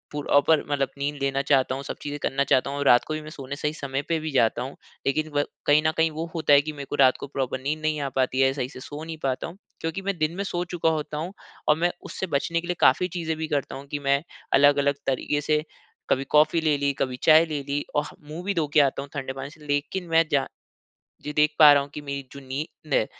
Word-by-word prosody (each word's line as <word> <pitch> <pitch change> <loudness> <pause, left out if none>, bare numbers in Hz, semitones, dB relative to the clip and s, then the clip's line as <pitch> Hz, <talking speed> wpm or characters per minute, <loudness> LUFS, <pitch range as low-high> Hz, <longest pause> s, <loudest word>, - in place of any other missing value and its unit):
Proper 145 +1 +3
मतलब 140 -1 +1
नींद 145 +1 -2
लेना 135 0 +1
चाहता 135 -2 +2
हूँ 135 - -6
सब - - -5
चीज़ें 145 0 -4
करना 140 +1 +1
चाहता 130 0 +2
हूँ। 140 0 -2
रात 120 -2 +6
को 155 - -2
भी 155 - -4
मैं 155 - -9
सोने 140 -1 -7
सही 150 0 -1
समय 140 -3 -3
पे 165 -1 +1
भी 155 0 -4
जाता 120 -3 +2
हूँ 135 +2 -7 0.3
लेकिन 155 +3 0
व 145 - +3 0.2
कहीं 145 +1 +6
न - - +3
कहीं 160 0 +3
वो 160 +2 -4
होता 155 -3 +3
है 140 - +8
कि 155 +2 -5
मेरे 140 -1 -7
को - - -2
रात 130 -2 +5
को - - -6
प्रॉपर 135 -2 -3
नींद 150 +4 -2
नहीं 155 -1 0
आ 140 - -2
पाती 130 0 +2
है 135 0 +4
सही 130 -2 -3
से 130 - -11
सो 145 +3 -8
नहीं 160 0 -6
पाता 130 -1 -1
हूँ। 170 +3 -11 0.2
क्योंकि 165 +4 -3
मैं 195 -1 -2
दिन 155 +1 0
में 200 - -1
सो 175 -3 -2
चुका 165 -2 +2
होता 155 -1 -2
हूँ 170 +5 -4 0.3
और 150 - +5
मैं 175 +2 +1
उससे 190 - -4
बचने 170 +4 0
के 175 - -9
लिए 180 - -1
काफ़ी 160 +8 +5
चीज़ें 160 -2 -2
भी 160 0 -3
करता 145 -4 -2
हूँ 135 +1 -9
कि 145 - -2
मैं 140 0 +2 0.3
अलग-अलग 145 0 +5
तरीके 135 +2 0
से 150 +1 +1 0.5
कभी 135 - +2
कॉफ़ी 155 +2 +4
ले 155 -2 +2
ली, 140 0 0
कभी 130 -2 -2
चाय 160 +1 +7
ले 150 -3 -3
ली 145 +1 -2
और 145 0 +2 0.2
मुँह 165 +3 -6
भी 200 +2 -1
धो 165 -5 0
के - - +6
आता 140 -1 +1
हूँ 140 - -9
ठंडे 135 -2 -4
पानी 135 +1 -6
से। 150 0 -16
लेकिन 145 +6 -2
मैं 165 0 +4
जा 140 -2 +2 0.8
जी 150 - -5
देख 150 +1 +2
पा 150 -2 +10
रहा 140 -1 +4
हूँ 140 - -10
कि - - -5
मेरी 140 -1 -5
जो 140 - -9
नींद 145 +2 -5
है - - +3
145 Hz, 265 wpm, -25 LUFS, 140-155 Hz, 0.8 s, पा